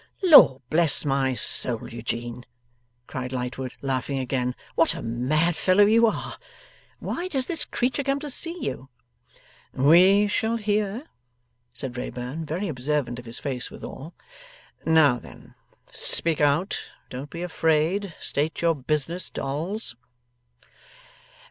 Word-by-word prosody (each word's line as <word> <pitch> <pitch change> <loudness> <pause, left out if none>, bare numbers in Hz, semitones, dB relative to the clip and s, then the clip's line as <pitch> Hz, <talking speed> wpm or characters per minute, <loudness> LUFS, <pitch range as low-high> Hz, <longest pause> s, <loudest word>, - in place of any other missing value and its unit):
'Lord 285 - +7
bless 160 -1 +4
my 135 -2 +1
soul, 120 -1 +1
Eugene!' 120 +1 -5 0.6
cried 125 0 -6
Lightwood, 125 0 -4
laughing 135 0 -2
again, 125 -1 -2 0.2
'what 165 - +2
a - - -6
mad 150 +9 0
fellow 190 +4 +4
you 230 +2 +5
are! 220 - -4 0.6
Why 355 - -4
does 270 -8 -1
this 335 +2 +3
creature 245 +3 -1
come 275 +1 0
to 300 - -5
see 335 +5 -2
you?' - - -5 0.8
'We 180 +9 +5
shall 220 +2 0
hear,' 210 +3 -1 0.7
said 125 0 -6
Wrayburn, 125 +5 -5
very 180 +7 -3
observant 130 -3 -2
of 120 - -11
his 115 +1 -2
face 130 -3 -3
withal. 155 +6 -10 0.7
'Now 150 -6 +4
then. - - -15 0.4
Speak 165 -3 +3
out. 145 +7 +1 0.3
Don't 130 +3 -7
be 170 +3 -6
afraid. 165 +3 0
State 150 +3 -2
your 170 -1 +4
business, 155 +4 -2
Dolls. 155 - -4
155 Hz, 125 wpm, -25 LUFS, 130-195 Hz, 0.8 s, Lord